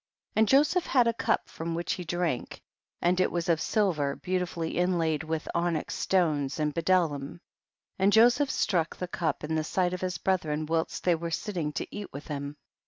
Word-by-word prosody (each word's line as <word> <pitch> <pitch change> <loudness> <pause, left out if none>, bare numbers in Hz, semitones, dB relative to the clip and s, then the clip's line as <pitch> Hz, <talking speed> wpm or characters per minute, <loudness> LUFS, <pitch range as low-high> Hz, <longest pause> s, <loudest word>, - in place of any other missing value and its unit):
11. - - +2
And 220 - +5
Joseph 300 +6 +4
had 250 -3 +4
a 230 - +2
cup - - 0
from 165 +1 -5
which 170 +1 -1
he 180 - -5
drank, 175 -5 -2 0.4
and 180 +1 +3
it - - +2
was 170 0 -2
of 165 -2 +2
silver 165 -11 +1
beautifully 180 -3 -2
inlaid 165 -4 +1
with 160 0 -3
onyx 170 -2 -1
stones 155 -7 +1
and 150 -1 0
bdellium, 165 -4 0 0.6
and 195 +2 +4
Joseph 240 +6 +5
struck 170 -4 0
the 180 - -4
cup 165 -4 -2
in 155 +1 -2
the 155 -1 +1
sight 180 +3 0
of 180 - -4
his 185 -1 -2
brethren 155 -5 0
whilst 160 +1 -1
they 180 - +4
were 170 0 -3
sitting 165 -3 -2
to - - -5
eat 205 -1 -6
with 145 +4 -9
him. 145 0 -5
170 Hz, 190 wpm, -28 LUFS, 155-185 Hz, 0.6 s, And